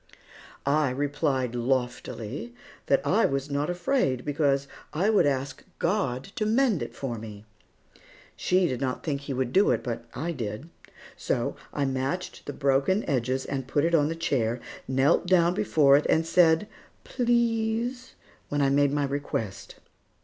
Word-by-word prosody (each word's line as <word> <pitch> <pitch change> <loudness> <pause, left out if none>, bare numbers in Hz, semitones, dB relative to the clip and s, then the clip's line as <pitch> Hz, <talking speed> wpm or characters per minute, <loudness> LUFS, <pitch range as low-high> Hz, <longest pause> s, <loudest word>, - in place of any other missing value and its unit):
I 145 0 +2
replied 140 -2 -1
loftily 120 -2 -3 0.3
that - - +2
I - - +3
was 135 +1 -3
not 145 +3 -1
afraid, 175 - 0
because 140 -2 +1 0.3
I 185 +8 +2
would 205 -8 +4
ask 135 -1 -2
God 165 -9 0
to 215 - 0
mend 230 - +2
it - - -6
for 120 -5 -4
me. 105 -1 -9 0.9
She 185 0 +2
did 130 -3 -3
not 130 -2 -2
think 140 -3 -2
He 140 -1 -5
would 130 -1 -2
do 200 +2 +5
it, - - +1
but 115 -2 -4
I 165 +6 -2
did. 125 +2 -5 0.4
So - - -1 0.2
I 145 - -1
matched 135 +6 -3
the - - -2
broken 140 +9 +1
edges 130 0 0
and 135 -2 -4
put 145 +2 +1
it 170 - 0
on 150 -3 +4
the 165 - -3
chair, 125 -8 0 0.3
knelt 135 +7 +2
down 175 -1 +4
before 155 -9 +4
it 150 - -1
and 160 +1 +3
said 165 +3 +4 0.4
"Please" 235 +1 0 0.3
when 145 - -1
I 135 - +3
made 140 0 +3
my 145 0 +1
request. 135 -8 -4
145 Hz, 155 wpm, -27 LUFS, 130-175 Hz, 0.9 s, do